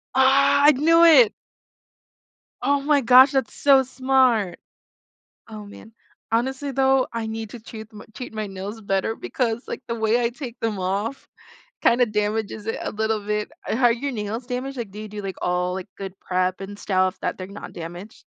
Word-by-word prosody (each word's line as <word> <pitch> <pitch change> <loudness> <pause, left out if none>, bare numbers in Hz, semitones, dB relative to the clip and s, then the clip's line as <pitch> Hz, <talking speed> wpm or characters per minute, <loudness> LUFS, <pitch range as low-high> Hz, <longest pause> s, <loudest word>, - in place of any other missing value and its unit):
Ah. 270 +1 +5 0.2
I - - +9
knew 330 +5 +4
it. 275 -10 +7 1.3
Oh 280 +2 +2
my 285 0 +2
gosh. 255 +2 +7
That's 265 -4 -1
so 275 -2 +5
smart. 255 -6 +1 0.9
Oh, 215 -2 -9
man. 220 +2 -13 0.4
Honestly 265 +5 -1
though, 265 0 +2
I 230 -1 -3
need 220 -1 -5
to 245 - -9
treat 220 -1 -10
m 210 0 -11
treat 250 - -8
my 215 -1 -4
nails 195 +3 -7
better 200 +2 -1
because 235 -1 -2
like - - -6
the 230 - -2
way 220 +1 +1
I 235 - +1
take 245 -1 -8
them 220 -3 -2
off 200 +7 -3 0.6
kinda 240 +1 +4
damages 210 -1 -2
it 225 - -2
a - - -3
little 220 -1 -2
bit. 210 +4 -2 0.2
Are 240 0 +3
your 275 +4 -3
nails 225 +1 -5
damaged? 255 +2 -4
Like, 235 -5 -5
do 205 - -11
you 215 - -8
do 210 0 -7
like 195 -1 -5
all 180 0 -1
like 190 -1 -5
good 195 -1 -8
prep 185 0 -1
and 200 +1 -7
stuff 185 -2 0
that - - -3
they're 185 - -6
not 200 +2 -10
damaged. 175 +5 -9
225 Hz, 185 wpm, -23 LUFS, 205-260 Hz, 1.3 s, I